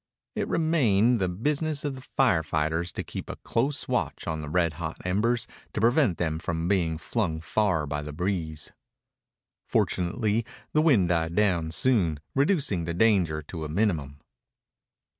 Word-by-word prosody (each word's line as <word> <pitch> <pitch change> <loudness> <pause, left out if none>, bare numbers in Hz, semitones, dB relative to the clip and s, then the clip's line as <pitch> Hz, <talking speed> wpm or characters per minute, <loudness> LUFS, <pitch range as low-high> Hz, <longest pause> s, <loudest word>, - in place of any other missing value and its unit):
It - - -2
remained 125 -9 +3
the 90 - +1
business 145 - -1
of 145 - -1
the 130 - -9
fire 125 -9 +2
fighters 80 +2 -1
to - - -3
keep - - -7
a - - -4
close 135 +5 -1
watch - - -1
on 80 0 -2
the 75 - -6
red 85 -1 +1
hot 80 -1 -4
embers 110 +6 +1 0.3
to - - -2
prevent 115 - +3
them 80 -2 -1
from 85 0 -2
being 85 -5 +1
flung 85 -3 -2
far 90 -2 +1
by 75 0 -3
the 75 +1 -6
breeze. 80 -2 -3 1.0
Fortunately 105 +5 +1 0.3
the 155 - +4
wind 120 - +4
died 85 -1 0
down 90 -6 +2
soon, 85 - +2
reducing 140 - +1
the 85 0 -3
danger 90 -7 +2
to 80 +1 -7
a 75 - -4
minimum. 75 -6 -1
90 Hz, 160 wpm, -27 LUFS, 80-115 Hz, 1.0 s, the